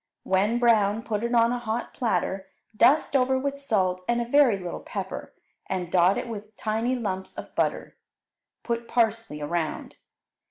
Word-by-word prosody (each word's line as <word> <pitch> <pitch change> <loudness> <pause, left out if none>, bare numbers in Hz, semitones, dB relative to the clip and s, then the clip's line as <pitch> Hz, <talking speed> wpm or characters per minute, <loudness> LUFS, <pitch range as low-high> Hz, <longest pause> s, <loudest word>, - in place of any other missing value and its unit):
When 200 +5 +2
brown, 225 -3 +3
put 215 -2 -2
it 235 +1 0
on 230 0 +4
a 245 - -1
hot 235 0 -3
platter, 190 -5 -1 0.3
dust 280 +5 +4
over 260 0 +3
with 280 +1 -2
salt 185 -9 0
and 240 0 +1
a 240 - -1
very 250 -4 +4
little 180 -2 -5
pepper, - - -6 0.4
and 180 -2 -3
dot 180 +2 +4
it - - -3
with 215 -2 -8
tiny 225 +4 0
lumps 190 -6 -4
of - - -8
butter. - - -1 0.7
Put 235 -1 -2
parsley 225 -8 0
around. 160 0 -3
225 Hz, 160 wpm, -26 LUFS, 190-240 Hz, 0.7 s, on